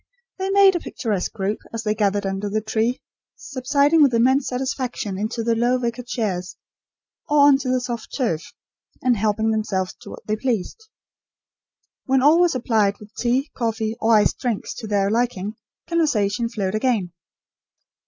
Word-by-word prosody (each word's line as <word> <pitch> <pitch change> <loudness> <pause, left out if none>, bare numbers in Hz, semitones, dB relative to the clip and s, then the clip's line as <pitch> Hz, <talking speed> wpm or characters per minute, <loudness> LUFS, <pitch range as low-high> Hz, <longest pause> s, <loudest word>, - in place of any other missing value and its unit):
They 380 0 -1
made 390 -1 +6
a - - +1
picturesque 215 - -3
group 205 0 -2
as 230 -1 -4
they 210 -1 +1
gathered 205 -1 0
under 195 +1 -2
the 215 +2 0
tree, 220 +3 -1 0.3
subsiding 280 +4 +1
with 275 -5 +5
immense 260 +4 +3
satisfaction 255 -4 -3
into 220 +4 -3
the 230 0 +2
low 240 +2 +2
wicker 240 0 -3
chairs, 205 -7 -3 0.7
or 295 -1 +4
on 285 -1 +6
to 260 -2 -3
the 255 0 +2
soft 240 -2 -5
turf, 220 - 0 0.6
and 250 -1 +3
helping 220 +1 +1
themselves 195 -4 -1
to - - -11
what - - -10
they 215 - 0
pleased. 255 - -3 1.2
When 265 -1 +2
all 305 +4 +6
were 350 - +5
supplied 220 -7 +1
with 210 0 -15
tea, 255 +4 0
coffee, 225 -2 -2
or 225 0 +4
iced 210 - +3
drinks, 235 -5 -2
to 225 - -6
their 200 -1 +1
liking, 220 -4 -1 0.3
conversation 235 -9 +1
flowed 200 -5 -2
again. 215 -5 0
230 Hz, 165 wpm, -22 LUFS, 210-260 Hz, 1.2 s, made